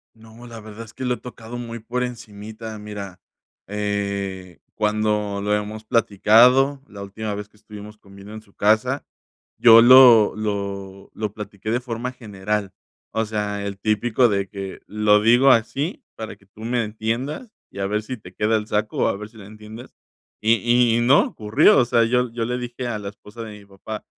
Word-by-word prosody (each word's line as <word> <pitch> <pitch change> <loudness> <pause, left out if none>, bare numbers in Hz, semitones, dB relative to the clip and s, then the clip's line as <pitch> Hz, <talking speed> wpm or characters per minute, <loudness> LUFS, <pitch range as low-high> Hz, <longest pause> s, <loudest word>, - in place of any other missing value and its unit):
No, 110 +2 -15
la 115 -1 -10
verdad 110 +1 -10
es 115 - -15
que 130 - -7
lo 125 - +1
he - - -8
tocado 120 -1 -10
muy 115 -1 -6
por 120 +3 -3
encimita. 110 -2 -7
Mira, 100 -3 -8 0.5
eh, 100 -3 -4 0.2
cuando 105 -1 -1
lo 105 +1 +1
hemos 105 +1 -4
platicado, 120 +5 +4
la 100 -5 -10
última 105 +2 -5
vez 105 0 -7
que 105 - -27
estuvimos 105 0 -12
comiendo 100 0 -14
en 110 - -9
su 100 -2 -26
casa, 110 +8 +1 0.5
yo 115 -1 +8
lo 120 -3 +8
lo 100 -2 -5
lo 105 -2 -4
platiqué 105 0 -6
de 120 - +1
forma 120 0 -4
general, 105 -3 -4 0.4
o 110 0 -1
sea, 105 -1 -3
el 100 -1 -5
típico 110 +4 +1
de 100 -1 -1
que, 95 -1 -7
lo 105 0 +3
digo 120 +5 +5
así 135 - 0
para 110 -1 -7
que 100 - -26
tú 100 +2 -17
me 120 +1 -1
entiendas 115 - -4 0.2
y - - -11
a 95 - -1
ver 105 +2 -1
si 125 +4 -6
te 90 -4 -14
queda 105 +3 +1
el 105 -1 -2
saco 105 0 -2
o - - +3
a - - -1
ver 105 +1 -8
si 110 - -19
lo 100 - -11
entiendes. 110 +3 -12 0.5
Y 115 +1 +3
y - - +1
no 130 +5 +5
ocurrió. 125 - +3
O 125 - +3
sea, 115 -1 +3
yo 125 +1 0
yo 115 0 -3
le 125 +2 -2
dije 125 0 -5
a 115 -3 -3
la 100 -1 -6
esposa 105 +2 -13
de 105 -2 -9
mi 100 - -17
papá: 100 +2 -9
110 Hz, 195 wpm, -22 LUFS, 105-120 Hz, 0.5 s, yo